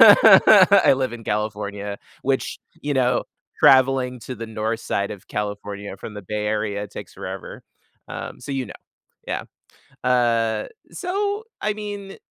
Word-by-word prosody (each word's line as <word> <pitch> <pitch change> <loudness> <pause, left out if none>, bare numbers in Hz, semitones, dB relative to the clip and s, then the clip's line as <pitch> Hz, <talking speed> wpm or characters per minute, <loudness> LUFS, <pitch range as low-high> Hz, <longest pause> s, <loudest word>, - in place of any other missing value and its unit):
I - - +8
live 130 -2 -1
in 115 -2 -8
California, 105 -1 -3 0.2
which, 135 0 -1 0.2
you 145 0 -2
know, 125 -1 +2 0.3
traveling 130 -2 +4
to 130 - -6
the 115 -1 -7
north 110 +1 -2
side 100 -2 -2
of 100 - -9
California 100 -1 -5
from 105 - -9
the 105 - -7
Bay 105 +2 -3
Area 105 -1 -1
takes 100 - -9
forever. - - -7 0.5
Um, - - -7
so 140 - -6
you 130 -2 -2
know. - - -10 0.5
Yeah. - - -2 0.6
Uh. 115 -3 +2 0.3
So, 405 +3 -2 0.2
I 210 - 0
mean, 205 -2 -6
eh, - - -12
115 Hz, 145 wpm, -23 LUFS, 105-135 Hz, 0.6 s, I